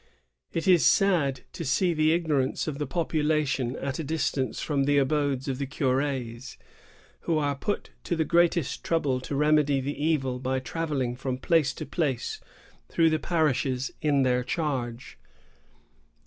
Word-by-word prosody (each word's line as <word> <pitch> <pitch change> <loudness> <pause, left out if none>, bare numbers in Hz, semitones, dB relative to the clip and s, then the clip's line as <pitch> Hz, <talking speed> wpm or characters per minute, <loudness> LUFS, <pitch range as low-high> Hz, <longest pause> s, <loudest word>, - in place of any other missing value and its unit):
"It 165 - -2
is 180 -3 +6
sad 160 -10 +3
to - - -5
see 170 +5 +2
the 155 0 +3
ignorance 155 -6 0
of 150 -2 -4
the 145 - -2
population 150 -5 0
at 140 +1 -4
a - - -2
dis 155 0 0
tance 130 -2 -2
from 140 -3 0
the 145 0 +3
abodes 140 -1 +1
of 135 -1 -2
the 140 - -2
cur^s, 130 -2 -2 0.6
who 165 - 0
are 145 -2 +1
put 205 +9 -3
to 175 - 0
the 160 -1 0
greatest 170 -3 +2
trouble 145 -6 0
to 140 - -4
remedy 150 -1 +3
the 145 +2 -4
evil 135 -6 0
by 130 +1 -1
travelling 135 -3 -2
from 130 0 -3
place 155 +1 +2
to - - -6
place 140 -9 -2 0.5
through 165 -1 +3
the 155 - +1
parishes 135 -6 0
in 145 -3 +3
their 125 -1 +2
charge." 125 - -3
145 Hz, 160 wpm, -27 LUFS, 130-160 Hz, 0.6 s, is